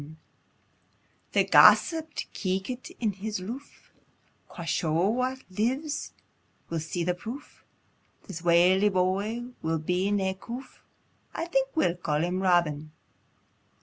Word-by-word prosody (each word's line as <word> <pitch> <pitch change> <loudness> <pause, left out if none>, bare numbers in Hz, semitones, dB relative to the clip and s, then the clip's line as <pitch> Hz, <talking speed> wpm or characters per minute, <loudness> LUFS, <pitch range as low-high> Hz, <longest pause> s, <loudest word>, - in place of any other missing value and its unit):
] - - -40
The - - +4
gossip 320 -2 +5 0.2
keekit 195 +7 -3
in 220 -3 +1
his 205 +1 -4
loof, 240 +10 -9 0.6
Quo' 170 - -8
scho, 165 +3 +1
"Wha 255 +3 0 0.2
lives 260 +10 -2 0.6
will 165 - -1
see 160 +3 -3
the 180 +1 +1
proof, 235 +11 -9 0.6
This 165 - -8
waly 180 +4 +5
boy 200 +6 -1
will 160 0 0
be 180 +5 0
nae 195 -2 +1
coof: 240 +7 -9 0.5
I - - -2
think 270 -5 0
we'll 180 - +2
ca' 155 -4 -1
him 175 +4 -1
Robin." 160 -5 +1
190 Hz, 120 wpm, -27 LUFS, 175-240 Hz, 0.6 s, gossip